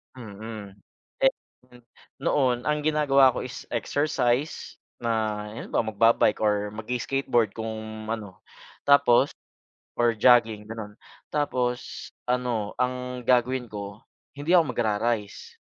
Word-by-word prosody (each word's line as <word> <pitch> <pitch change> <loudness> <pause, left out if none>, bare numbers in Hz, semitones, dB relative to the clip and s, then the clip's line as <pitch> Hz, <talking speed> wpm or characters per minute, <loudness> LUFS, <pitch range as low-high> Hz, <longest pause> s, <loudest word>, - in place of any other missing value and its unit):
Mm, 105 -3 -9 0.4
eh, - - +4 0.9
noon 125 -3 +2
ang 150 0 0
ginagawa 140 -4 +4
ko - - -3
is 130 - -8
exercise 135 +2 -1 0.2
na 110 -2 0
ayun 110 - -7
ba - - +2
magba-bike 110 0 +3
or 105 -1 +1
mag 110 0 -8
skateboard 125 -3 0
kung 110 -1 -6
ano. 105 -4 -5 0.5
Tapos 140 -2 +5 0.6
or 120 -1 +3
jogging 115 -3 +4
ganun. 110 -1 -8 0.3
Tapos 125 -4 -2 0.2
ano, 125 -4 -1
ang 125 0 -2
gagawin 125 0 +1
ko 100 +1 -7 0.3
hindi 145 +4 -3
ako 180 -2 +7
mag - - -3
ra-rice. 105 -1 -2
120 Hz, 115 wpm, -26 LUFS, 110-125 Hz, 0.9 s, ako